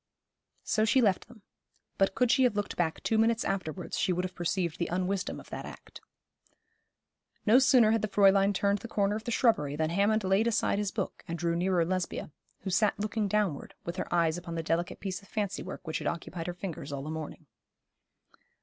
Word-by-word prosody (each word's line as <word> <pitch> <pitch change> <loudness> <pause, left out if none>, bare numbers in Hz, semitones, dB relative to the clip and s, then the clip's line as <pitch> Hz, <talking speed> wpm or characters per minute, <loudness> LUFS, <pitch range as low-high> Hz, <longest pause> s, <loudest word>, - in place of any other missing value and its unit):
So 215 - +1
she 225 +4 +4
left 205 -6 +2
them; 235 -4 -17 0.6
but 195 0 +2
could 250 -2 +3
she 265 - +4
have 240 - +2
looked 205 -1 -2
back 165 -2 -1
two 220 - +2
minutes 225 +1 +2
afterwards 185 -2 -3
she - - +2
would 180 +1 0
have 185 - -6
perceived 175 -1 -2
the 170 - 0
unwisdom 185 +2 -1
of - - -15
that - - -5
act. - - -11 1.4
No 225 +4 +7
sooner 255 -4 +5
had 225 -1 +2
the 215 - 0
Fräulein 195 -1 +4
turned 200 +1 +1
the 230 - -8
corner 205 -2 +1
of 220 - -6
the 240 - -2
shrubbery 150 - +2
than 155 +1 0
Hammond 205 +4 +2
laid 195 +4 +2
aside 225 -3 +1
his 205 -1 0
book 200 -2 -4
and 170 - -3
drew 170 0 0
nearer 175 -1 +2
Lesbia, 185 -3 -3 0.3
who 190 - -4
sat 210 +3 +2
looking 215 0 -1
downward, 200 -7 -1
with 170 +2 -4
her - - -4
eyes 170 -1 +2
upon 170 -1 -7
the 165 - -2
delicate 165 +2 -1
piece 190 -1 -4
of 200 - -18
fancy 205 -2 -2
work - - -8
which 160 - -2
had - - -3
occupied 170 0 -4
her 175 - -2
fingers 170 -6 -6
all 140 -1 -4
the 155 - -5
morning. 160 -1 -6
195 Hz, 210 wpm, -30 LUFS, 170-215 Hz, 1.4 s, No